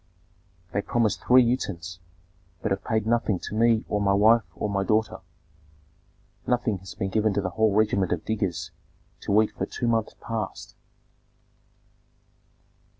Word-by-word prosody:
"They 100 - +1
promised 115 0 0
three 125 0 +6
utens, 90 -9 -3 0.6
but 110 - -1
have 95 - -1
paid 110 -1 0
nothing 115 -3 +1
to - - -6
me 115 0 +3
or 105 - -1
my 100 -1 +3
wife 110 +4 +5
or - - -2
my 100 -1 -1
daughter. 110 +2 0 1.3
Nothing 120 -5 0
has 95 -1 -11
been 95 -1 -3
given 110 -1 +1
to 100 - +1
the 95 -1 -3
whole 110 +2 +2
regiment 105 -4 +2
of 85 -3 -2
diggers 95 -7 -2 0.5
to 100 +1 +2
eat 110 - -4
for - - -4
two 120 - -3
months 115 -2 0
past." 110 -4 -5
105 Hz, 150 wpm, -25 LUFS, 95-115 Hz, 1.3 s, three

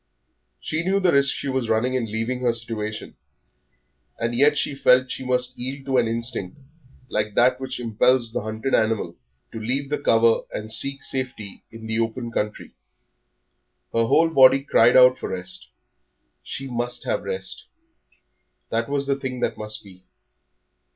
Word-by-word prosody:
She 160 +2 -2
knew 195 +2 +1
the 185 -3 +3
risk 140 -1 +4
she - - -5
was 130 -3 -1
running 120 +4 +1
in 130 -3 0
leaving 115 +3 -3
her 125 -2 +1
situation, 110 -2 -5 1.0
and 115 +1 -2
yet 145 +4 +4
she 140 - 0
felt 130 -1 +3
she - - -5
must 125 0 -1
yield 135 +2 -5
to 135 -1 +1
an 120 -2 +3
instinct 115 -3 -3 0.5
like 105 -2 -2
that 125 +1 +3
which 130 -1 -5
impels 120 +1 +1
the - - -1
hunted 110 +5 -4
animal 110 -6 +1 0.4
to 115 - -6
leave 135 +6 -2
the 150 - 0
cover 115 -4 +3
and 110 +1 -5
seek 140 +4 0
safety 130 -7 -4
in 115 0 -11
the 110 0 -1
open 115 +1 -2
country. 105 -1 -3 1.2
Her 115 0 +2
whole 165 +8 +4
body 135 -2 +6
cried 125 -3 +4
out 125 0 +6
for - - -5
rest, 90 -4 -5 0.7
she 135 +1 -6
must 120 -1 -3
have - - -1
rest; 475 0 -4 1.1
that 115 +2 -1
was 140 0 0
the 140 0 0
thing 130 -2 -5
that - - 0
must 105 0 -5
be. 95 -2 -16
125 Hz, 165 wpm, -23 LUFS, 110-130 Hz, 1.2 s, body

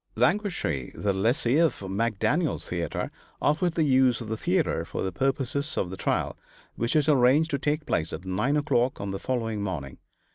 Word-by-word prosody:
Languishe, 180 - 0
the 100 -1 0
lessee 120 +7 +2
of 165 -2 +3
McDaniel's 115 - 0
theatre, 85 -1 -3 0.3
offered 160 +4 +1
the 165 - +2
use 130 -4 +4
of 115 -3 -7
the 110 - -1
theatre 170 - 0
for - - -4
the 95 - -1
purposes 135 - -1
of 90 - -1
the - - -4
trial, 95 - -1 0.4
which 115 +4 -1
was 150 -1 +3
arranged 145 +3 +4
to 140 - 0
take 150 +1 -1
place 80 0 -1
at 85 +4 -6
9 105 +11 +1
o'clock 130 -4 +1
on 100 -1 -3
the 95 - -4
following 115 -5 -2
morning. 85 -10 -4
125 Hz, 180 wpm, -27 LUFS, 95-150 Hz, 0.4 s, use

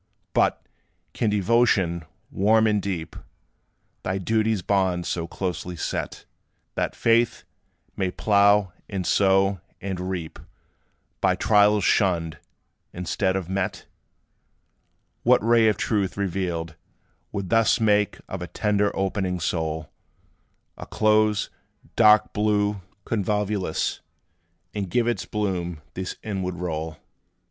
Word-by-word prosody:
But, - - +1 0.5
can 115 - 0
devotion, 100 -5 +2 0.3
warm 110 +3 +3
and 105 -2 +2
deep, 90 -5 -4 0.9
Thy 95 +1 -2
duty's 110 0 0
bounds 95 -3 +1
so 85 -1 -2
closely 90 0 -4
set, - - -4 0.5
That - - -2
faith 115 0 +2 0.5
may 95 - 0
plough, 100 -1 +3 0.2
and 95 -3 -3
sow, 95 -1 +3 0.2
and 95 -2 -4
reap 85 -4 -5 0.8
By - - +3
trials 105 -1 +4
shunned, 85 -5 +1 0.5
instead 95 +2 -1
of 95 -3 -2
met? 95 0 -3 1.4
What - - +4
ray 115 -1 +5
of 105 - +2
truth, 100 -4 -1
revealed, 85 -4 -2 0.6
would 100 -2 -4
thus 115 0 +4
Make 105 -2 +2
of 95 - -6
a 90 - -4
tender 105 0 +1
opening 95 -2 -1
soul 80 -2 -2 0.9
A - - -8
close, 110 -1 +2 0.4
dark 105 -2 +5
blue 105 -1 +1 0.2
convolvulus, 105 -4 -1 0.7
And 100 -3 -3
give 120 +4 +1
its 120 - -1
bloom 90 -6 -3
this 95 0 -5
inward 95 -4 -3
roll? 80 -2 -4
95 Hz, 110 wpm, -24 LUFS, 90-105 Hz, 1.4 s, ray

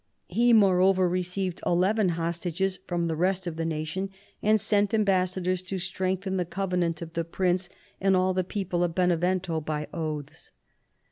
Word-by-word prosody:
He, 240 +1 +3
moreover, 190 -3 +5
received 180 0 -2
eleven 190 +3 +2
hostages 175 +3 -2
from 175 -1 -1
the 165 -1 -1
rest 185 +3 0
of 170 -2 -4
the 165 0 -2
nation, 160 +5 -3 0.3
and 215 +1 +4
sent 210 0 +2
am 215 - +3
bassadors 185 -1 +1
to 195 - -2
strengthen 190 +1 -2
the 180 - +1
covenant 175 -2 -1
of 165 0 -10
the 170 - -1
prince 180 +1 0 0.3
and 190 -1 +4
all 185 0 +2
the 185 0 +1
people 180 -2 -2
of 170 -1 -1
Benevento 180 -1 +1
by 150 0 -3
oaths." 155 -3 -5
180 Hz, 160 wpm, -27 LUFS, 170-190 Hz, 0.3 s, moreover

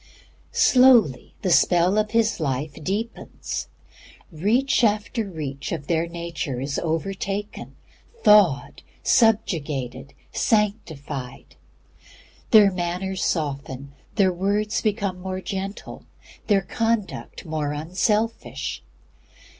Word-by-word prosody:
Slowly 245 - +4
the 185 - +1
spell 180 +4 +4
of 210 0 0
His 225 -2 +1
Life 145 0 -2
deepens. 215 +7 -4 0.6
Reach 225 - +1
after 215 0 0
reach 145 -5 -5
of 155 -4 -4
their 165 +1 0
nature 170 -5 -4
is 140 +2 -2
overtaken, 195 +5 -3 0.5
thawed, 195 -10 +4 0.2
subjugated, 145 - +1 0.2
sanctified. 155 - -2 0.9
Their 210 -3 +7
manner 180 +1 -3
softens, 140 -6 -3 0.2
their 190 -4 +3
words 205 +4 0
become 200 -4 -1
more 185 0 -4
gentle, 195 +1 -6 0.4
their 200 -2 +4
conduct 225 -2 -2
more 155 -3 -2
unselfish. 195 +9 -1
185 Hz, 90 wpm, -23 LUFS, 150-210 Hz, 0.9 s, Their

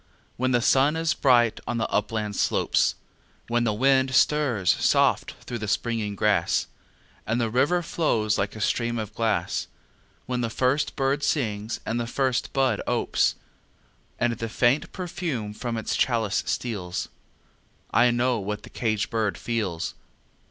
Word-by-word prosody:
When 130 +1 0
the 120 -2 +2
sun 135 +5 +4
is 165 0 +1
bright 120 -4 +3
on 120 - -1
the 110 - 0
upland 105 -2 -1
slopes; - - +2 0.5
When 120 0 +1
the 110 - +2
wind 130 +2 +3
stirs 130 - +3
soft - - +3
through 120 - -5
the 110 - -4
springing 110 -1 -1
grass, - - +2 0.6
And 115 +2 0
the 115 -2 0
river 145 +9 +2
flows 110 -11 0
like 100 +1 -2
a 110 - -7
stream 120 +2 0
of 110 -1 -5
glass; 110 -6 -1 0.6
When 125 0 -2
the 115 - -1
first 130 +5 0
bird 135 +1 0
sings 110 -7 -1
and 115 +2 -1
the 120 - -2
first 130 0 0
bud 130 -6 +1
opes, - - +1 0.8
And 120 -1 +1
the 115 0 -5
faint 120 +6 +2
perfume 160 - -4
from 115 +1 -4
its 110 - -2
chalice 115 -5 +1
steals 95 -7 -3 0.8
I 125 - +5
know 120 0 +1
what 105 +1 -4
the - - -12
caged 110 -2 -1
bird 110 -3 0
feels! 105 -8 -2
120 Hz, 150 wpm, -25 LUFS, 110-130 Hz, 0.8 s, I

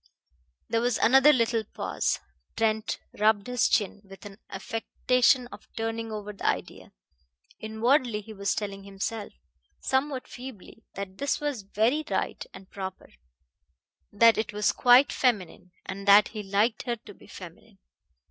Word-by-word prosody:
There 230 - 0
was 240 -1 +1
another 270 +5 +6
little 230 -4 +1
pause. - - -2 0.4
Trent 220 -1 0 0.2
rubbed 210 -1 +3
his 250 -2 +1
chin, 205 -1 0
with 195 0 -14
an 200 0 -11
affectation 245 +5 +1
of 205 - -12
turning 225 0 -3
over 210 -1 -6
the 200 - -12
idea. - - -3 0.7
Inwardly 225 +1 +1
he 220 +1 -11
was 200 -1 -1
telling 200 -2 -4
himself, 200 +2 -5 0.5
somewhat 265 0 -1
feebly, 245 -4 -11
that 195 -1 -7
this 280 0 0
was 290 -6 -3
very 220 +9 0
right - - -2
and 190 - -13
proper; 190 -1 -7 1.0
that 225 +2 +5
it 220 - -2
was 210 0 +2
quite 250 +3 +5
feminine, 195 -7 -1
and 195 +1 -7
that 200 +1 +7
he 215 - -6
liked 205 +4 +1
her 240 - 0
to 220 - -14
be - - -18
feminine. - - -12
220 Hz, 145 wpm, -27 LUFS, 200-245 Hz, 1.0 s, that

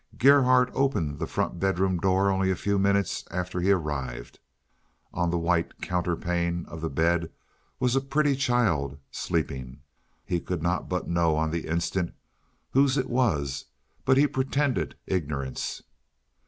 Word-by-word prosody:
Gerhardt 130 -2 +5
opened 85 - 0
the - - -2
front 90 - -2
bedroom 95 -1 +1
door 95 +2 +3
only 95 0 +1
a 95 - +2
few 100 +2 0
minutes 100 -1 +1
after 90 0 -3
he 90 +2 +1
arrived. 70 -10 -2 0.7
On 85 0 0
the 85 - 0
white 85 0 0
counterpane 85 -1 -1
of 80 - -9
the 80 - -2
bed 85 0 +1 0.5
was 125 -1 +2
a 135 - +3
pretty 140 +1 +1
child, 105 - +1
sleeping. 65 0 -3 0.4
He 90 - 0
could 85 -2 -4
not 85 +1 -1
but 90 0 -2
know 85 -2 +2
on 80 0 0
the 85 0 -3
instant 85 +2 -1 0.6
whose 135 +1 +3
it 130 -2 -1
was, 75 - 0 0.4
but 130 0 +4
he 145 - +6
pretended 135 0 0
ignorance. 70 -7 -3
90 Hz, 145 wpm, -27 LUFS, 80-120 Hz, 0.7 s, he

